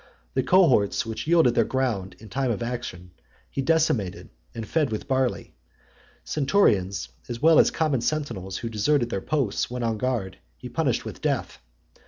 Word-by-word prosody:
The 130 - +2
cohorts 130 - +3
which 115 +5 -5
yielded 165 -7 +5
their 115 - +3
ground 115 -7 -2
in 110 - -13
time 130 +4 -1
of 115 0 -1
action, 115 -7 -5 0.4
he 135 - -2
decimated, 135 - 0 0.2
and 115 -2 -5
fed 150 -3 +1
with 110 - -4
barley. 130 -2 -1 0.7
Centurions, 100 - +1 0.2
as 120 -1 -4
well 160 +2 +6
as - - +6
common 150 -6 0
sentinels, 115 -12 -2
who 115 - -4
deserted 120 +3 +1
their 95 - -2
posts 135 -7 -1
when 125 0 -4
on 115 -2 -1
guard, 115 - -2 0.2
he - - -9
punished - - 0
with - - -8
death. - - -2
120 Hz, 165 wpm, -25 LUFS, 105-145 Hz, 0.7 s, well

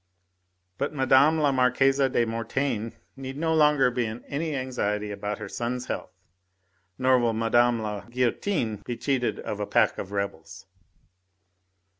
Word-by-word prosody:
But 140 +2 -2
Mme. 135 +3 +4
la 145 -2 +3
Marquise 135 +1 +3
de 120 -2 +1
Mortaine 115 0 -2 0.2
need 135 0 -7
no 160 +1 0
longer 150 -4 +4
be 120 -1 -1
in 110 +2 -7
any 155 +1 -3
anxiety 105 -6 -2
about 105 +1 -4
her 105 - -7
son's 125 +4 -3
health, - - -4 0.9
nor 130 0 +4
will 120 -1 +1
Mme. 120 +1 +2
la 105 -1 -4
Guillotine 125 - -1
be 120 +4 -6
cheated 125 +1 -1
of - - -5
a - - -2
pack - - +2
of 95 - -6
rebels." 100 -5 -5
125 Hz, 145 wpm, -26 LUFS, 115-135 Hz, 0.9 s, Mme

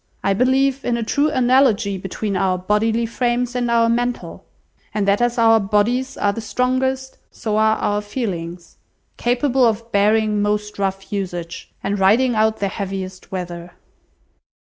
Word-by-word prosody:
I 195 - +2
believe 265 +4 +2
in 240 -1 0
a 235 - -2
true 285 +7 +1
analogy 245 -6 +3
between 195 +2 -4
our 185 0 +1
bodily 220 +5 +1
frames 240 +1 -1
and 245 -1 0
our 230 0 +3
mental; 240 +1 -2 0.5
and 205 -2 0
that 200 +3 +3
as 240 +1 +1
our 225 -1 +5
bodies 220 +6 0
are 200 - +1
the 230 - -5
strongest, 260 +3 -1
so 215 -2 -3
are 220 0 +3
our 205 0 0
feelings; 180 -6 -5 0.4
capable 250 +2 +1
of 230 0 +1
bearing 210 +1 +2
most 210 0 -2
rough 195 0 -3
usage, 175 -4 -5
and 200 0 -1
riding 230 +7 +4
out 220 0 +2
the 200 - -1
heaviest 190 -1 -6
weather." 175 -2 -6
220 Hz, 150 wpm, -20 LUFS, 200-245 Hz, 0.5 s, our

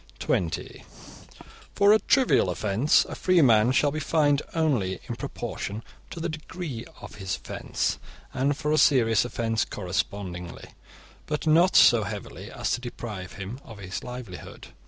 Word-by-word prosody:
(20) 85 -3 -2 0.9
For 200 +1 +6
a 220 - +5
trivial 260 - +3
offence, 105 - +2
a - - -8
free 185 -3 +3
man 115 -1 +5
shall 145 +2 +3
be 155 - -3
fined 145 -2 +2
only 125 - 0
in - - -4
proportion 105 +3 -5 0.3
to - - -7
the 165 - -2
degree 155 -5 -6 0.2
of - - -10
his 95 0 -2
offence, - - -3 0.3
and 140 +2 0
for 150 -1 -1
a 155 - +3
serious 115 -5 +4
offence 115 -2 -1
correspondingly, 90 -2 -4 0.6
but 150 0 -3
not 170 +4 +4
so 120 -2 +7
heavily 95 - -7
as - - -3
to - - -1
deprive 110 -6 -7
him 100 +4 -7
of 110 - -11
his 95 -2 -6
livelihood. 125 -7 -9
120 Hz, 150 wpm, -26 LUFS, 100-155 Hz, 0.9 s, so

